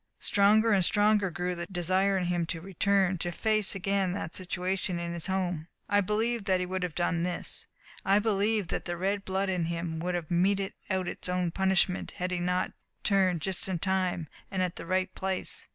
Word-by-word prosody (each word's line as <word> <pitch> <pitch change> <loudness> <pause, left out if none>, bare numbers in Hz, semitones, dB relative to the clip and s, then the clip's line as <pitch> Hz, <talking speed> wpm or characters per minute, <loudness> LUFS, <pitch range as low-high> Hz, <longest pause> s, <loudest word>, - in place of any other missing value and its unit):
Stronger 215 +3 +4
and 195 -3 +4
stronger 205 +1 +3
grew 180 +1 -2
the 170 0 -5
desire 190 +2 +1
in 185 - 0
him 175 -1 0
to 165 - -3
return, 190 +1 +1
to 175 - -2
face 215 +1 +2
again 195 -1 0
that 170 -4 -4
situation 185 0 -2
in 170 0 -3
his 170 -2 -2
home. 180 -4 -1 0.2
I 205 0 +3
believe 220 +2 0
that 190 -2 +2
he 180 - -1
would 185 +1 -3
have 180 -3 -3
done 175 -1 +1
this 175 0 -2 0.4
I 195 +1 +4
believe 210 -2 +1
that - - -2
the 175 -1 -3
red 195 +3 0
blood 190 +1 0
in 180 -3 0
him 165 -1 -3
would 180 +2 -1
have 170 -2 -4
meted 195 +3 +2 0.2
out 190 -2 0
its - - -2
own 180 -1 0
punishment 190 0 +1
had 180 +1 -2
he 180 - 0
not 180 +1 0 0.3
turned 185 -5 +3
just 190 +4 -3
in 185 - 0
time, 185 -2 0 0.2
and 190 -2 0
at 180 -2 -2
the - - -8
right 185 +1 0
place. 190 -1 -3
185 Hz, 200 wpm, -29 LUFS, 175-195 Hz, 0.4 s, Stronger